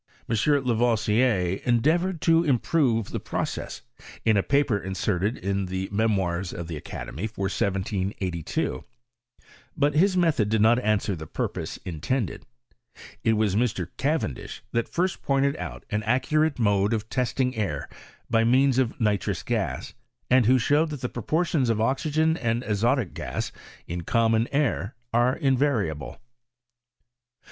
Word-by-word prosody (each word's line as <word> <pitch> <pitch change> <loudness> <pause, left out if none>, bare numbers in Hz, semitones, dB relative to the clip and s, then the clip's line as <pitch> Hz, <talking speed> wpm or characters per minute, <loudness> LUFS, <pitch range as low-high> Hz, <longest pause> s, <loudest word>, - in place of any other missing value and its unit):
M. - - 0 0.3
La 125 -2 +1
voisier 110 -4 +2
endeavoured 160 +9 +2
to 165 0 +4
improve 125 - +1
the - - -2
process, - - -4 0.4
in 110 -2 +4
a. 100 - +4
paper 140 -3 +2
inserted 95 +3 -1
in 100 0 -2
the 95 +1 -3
Memoirs 95 -4 0
of 85 -1 -6
the 85 - -5
Academy, 75 - -5
for 105 -2 -6
1782; 95 -3 -2 0.9
but 145 0 +2
his 185 +5 +3
method 155 - +2
did 110 0 +2
not 115 +3 +5
answer 105 -4 0
the 80 -2 -8
purpose - - -4
intended: 95 - -3 0.8
it 115 - +3
was 105 -3 +1
Mr. 105 -7 0
Cavendish 140 - -2
that 115 0 -1
first 180 +1 -1
pointed 140 +1 +1
out - - -7
an 105 0 0
accurate 150 +7 +1
mode 105 -2 +2
of 110 -1 -2
testing 125 +1 0
air 95 -10 -2 0.4
by 115 -1 +3
means 130 +2 +4
of 125 -2 0
ni 105 -3 +2
trous 95 0 -4
gas, 100 - -2 0.4
and 125 -3 +5
who 130 +2 +6
showed 145 +6 +2
that 145 -4 -6
the 125 - -2
proportions 155 +1 0
of 110 -2 +1
oxygen 155 +6 +1
and 120 -2 -1
azotic 115 0 +1
gas - - -4 0.3
in 85 +1 -4
common 115 +4 +2
air 135 -5 0 0.2
are 120 +3 +3
invariable. 125 - 0
115 Hz, 140 wpm, -26 LUFS, 100-135 Hz, 0.9 s, who